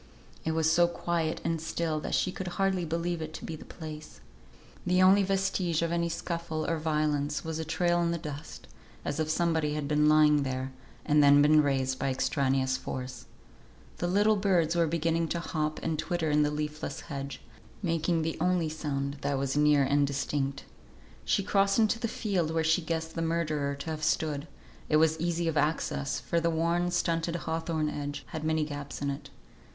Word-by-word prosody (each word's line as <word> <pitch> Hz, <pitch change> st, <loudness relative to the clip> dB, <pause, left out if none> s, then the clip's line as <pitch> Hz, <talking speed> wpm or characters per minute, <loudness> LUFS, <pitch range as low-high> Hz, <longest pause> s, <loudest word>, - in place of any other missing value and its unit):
It 160 Hz, -, -1 dB
was 160 Hz, 0 st, +2 dB
so 175 Hz, +1 st, +5 dB
quiet 170 Hz, -2 st, -2 dB
and 165 Hz, -1 st, -1 dB
still 160 Hz, -1 st, -1 dB
that -, -, -2 dB
she 185 Hz, -, +1 dB
could 185 Hz, 0 st, -6 dB
hardly 190 Hz, -2 st, +1 dB
believe 170 Hz, +1 st, -2 dB
it 155 Hz, 0 st, -6 dB
to -, -, -7 dB
be 165 Hz, -, -5 dB
the -, -, -10 dB
place. 155 Hz, -2 st, -9 dB, 0.6 s
The 180 Hz, 0 st, +2 dB
only 190 Hz, +2 st, +6 dB
vestige 190 Hz, -4 st, 0 dB
of 170 Hz, -, -1 dB
any 170 Hz, 0 st, 0 dB
scuffle 170 Hz, -2 st, -3 dB
or 165 Hz, -1 st, 0 dB
violence 150 Hz, -2 st, 0 dB
was 160 Hz, 0 st, -3 dB
a -, -, -1 dB
trail 175 Hz, +2 st, +1 dB
on 170 Hz, -1 st, +1 dB
the 170 Hz, -, 0 dB
dust, 150 Hz, -, -8 dB, 0.4 s
as 145 Hz, -, -2 dB
if 155 Hz, -1 st, 0 dB
somebody 160 Hz, -2 st, +1 dB
had 150 Hz, -2 st, -2 dB
been 150 Hz, 0 st, +3 dB
lying 150 Hz, -1 st, +5 dB
there, 130 Hz, -1 st, -3 dB, 0.3 s
and 150 Hz, 0 st, +4 dB
then 145 Hz, 0 st, +7 dB
been 155 Hz, +1 st, +6 dB
raised 135 Hz, -2 st, 0 dB
by 135 Hz, -, 0 dB
extraneous 130 Hz, 0 st, +1 dB
force. 125 Hz, -1 st, -6 dB, 0.7 s
The 175 Hz, -, -1 dB
little 205 Hz, +4 st, +3 dB
birds 175 Hz, -5 st, +2 dB
were 170 Hz, -1 st, +3 dB
beginning 165 Hz, +1 st, 0 dB
to 170 Hz, -, -2 dB
hop 155 Hz, -2 st, -2 dB
and 160 Hz, -2 st, -1 dB
twitter 170 Hz, -3 st, -1 dB
in 150 Hz, 0 st, +4 dB
the 150 Hz, -, +3 dB
leafless 150 Hz, 0 st, -4 dB
hedge, 140 Hz, -2 st, -6 dB, 0.4 s
making 165 Hz, -1 st, +1 dB
the 160 Hz, 0 st, -2 dB
only 180 Hz, -2 st, +2 dB
sound 145 Hz, -2 st, -3 dB
that 140 Hz, -1 st, 0 dB
was 135 Hz, 0 st, -1 dB
near 150 Hz, -1 st, +4 dB
and 140 Hz, +1 st, +2 dB
distinct. 140 Hz, 0 st, -2 dB, 0.6 s
She 200 Hz, -, +2 dB
crossed 195 Hz, 0 st, +2 dB
into 225 Hz, 0 st, +3 dB
the 230 Hz, -, -1 dB
field 195 Hz, -8 st, -1 dB
where 160 Hz, 0 st, 0 dB
she 160 Hz, +3 st, +3 dB
guessed 160 Hz, 0 st, -3 dB
the 165 Hz, -, -3 dB
murderer 155 Hz, -4 st, 0 dB
to 140 Hz, +3 st, -5 dB
have 155 Hz, -1 st, -5 dB
stood; 150 Hz, -1 st, 0 dB, 0.4 s
it 155 Hz, -, +3 dB
was 160 Hz, 0 st, +3 dB
easy 170 Hz, 0 st, 0 dB
of 160 Hz, -1 st, 0 dB
access, 145 Hz, -1 st, 0 dB
for 170 Hz, -, 0 dB
the 170 Hz, 0 st, +1 dB
worn, 170 Hz, +2 st, +1 dB
stunted 170 Hz, -1 st, 0 dB
hawthorn 160 Hz, -1 st, -2 dB
hedge 145 Hz, -1 st, -4 dB
had 160 Hz, -2 st, -5 dB
many 155 Hz, -1 st, +1 dB
gaps 145 Hz, -1 st, -6 dB
in 140 Hz, -, 0 dB
it. 140 Hz, -, -7 dB
160 Hz, 190 wpm, -29 LUFS, 150-170 Hz, 0.7 s, then